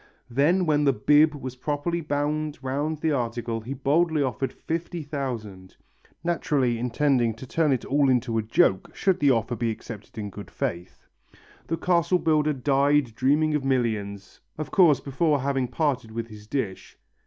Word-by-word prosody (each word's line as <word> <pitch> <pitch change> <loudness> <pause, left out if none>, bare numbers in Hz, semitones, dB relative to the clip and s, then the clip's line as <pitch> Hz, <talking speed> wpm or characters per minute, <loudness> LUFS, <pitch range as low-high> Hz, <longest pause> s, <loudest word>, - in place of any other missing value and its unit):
Then 160 +9 +3
when 150 -2 +2
the 140 - +4
"bib" 150 +7 +4
was 130 -3 -6
properly 150 +6 -2
bound 150 0 -2
round 145 +4 -1
the 160 - +1
article 120 -3 -2
he 125 +5 -6
boldly 150 +3 +2
offered 135 0 -2
fifty 165 0 -4
thousand 115 -10 -6 0.5
naturally 140 -8 0
intending 125 -1 +1
to 115 - -9
turn 155 +3 +1
it 130 - 0
all 140 0 +2
into 120 -2 +1
a - - +1
joke 105 -3 +2
should 190 -2 +1
the 145 - +4
offer 115 -1 +1
be 115 0 -1
accepted 110 -1 -8
in 105 -2 -4
good 100 +1 -9
faith. 90 +2 -5 0.6
The 165 - -1
castle 170 +1 +2
builder 155 -3 +2
died 140 -1 +2
dreaming 145 +6 +2
of 150 -2 0
millions, 110 -7 -2 0.2
of 155 - -5
course 165 -7 +5
before 145 +1 0
having 135 -2 0
parted 130 -3 -1
with 115 +1 -5
his 105 -1 -12
dish. 110 -7 -4
135 Hz, 165 wpm, -25 LUFS, 115-150 Hz, 0.6 s, course